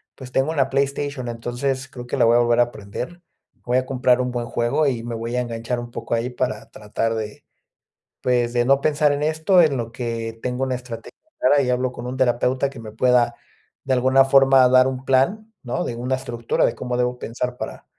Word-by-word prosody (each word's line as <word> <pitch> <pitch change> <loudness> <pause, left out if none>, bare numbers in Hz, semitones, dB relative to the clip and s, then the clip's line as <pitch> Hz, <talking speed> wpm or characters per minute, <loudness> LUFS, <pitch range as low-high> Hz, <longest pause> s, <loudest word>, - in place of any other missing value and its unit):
pues, 130 -1 -11
tengo 135 +4 +1
una 135 -4 +1
PlayStation. 140 -1 -1
Entonces 120 +3 -3
creo 125 -3 -9
que - - -3
la - - +4
voy 115 +1 +5
a - - +4
volver 120 0 +3
a 120 0 +1
prender. 120 - -7 0.4
Voy 125 +1 +2
a 130 - 0
comprar 125 -1 +2
un 125 0 -2
buen 120 -1 -3
juego 120 +7 +1
y 120 -4 -1
me 120 0 -4
voy 115 +2 -4
a 125 - +1
enganchar 120 0 -3
un 120 0 -8
poco - - -5
ahí 115 +2 -1
para 125 -3 -3
tratar 110 +2 -2
de 110 -1 -6 0.8
pues, 120 -1 +1
de 120 -1 +2
no 135 +2 +3
pensar 150 0 +2
en 145 +1 -1
esto 160 +4 +3
en 155 -4 +3
lo 115 -1 -4
que 115 -1 -4
tengo 125 +1 -2
una 130 -1 -1
estrategia 125 -2 -8 0.3
clara 140 +3 +4
y 130 - -1
hablo 125 0 0
con 120 0 -7
un 130 +1 -5
terapeuta 130 +1 +1
que 135 -3 -12
me 110 -1 -9
pueda 120 +1 +2 0.5
de 135 - 0
alguna 130 +1 +4
forma 135 -1 +6
dar 130 0 +6
un 130 0 -4
plan, 195 +13 +1
¿no?, 120 -2 -2
de 120 - -4
una 125 +2 -1
estructura 120 -3 -1
de - - +1
cómo 125 0 -3
debo 125 0 -1
pensar 125 +2 -4
para, - - -7
125 Hz, 220 wpm, -22 LUFS, 120-135 Hz, 0.8 s, forma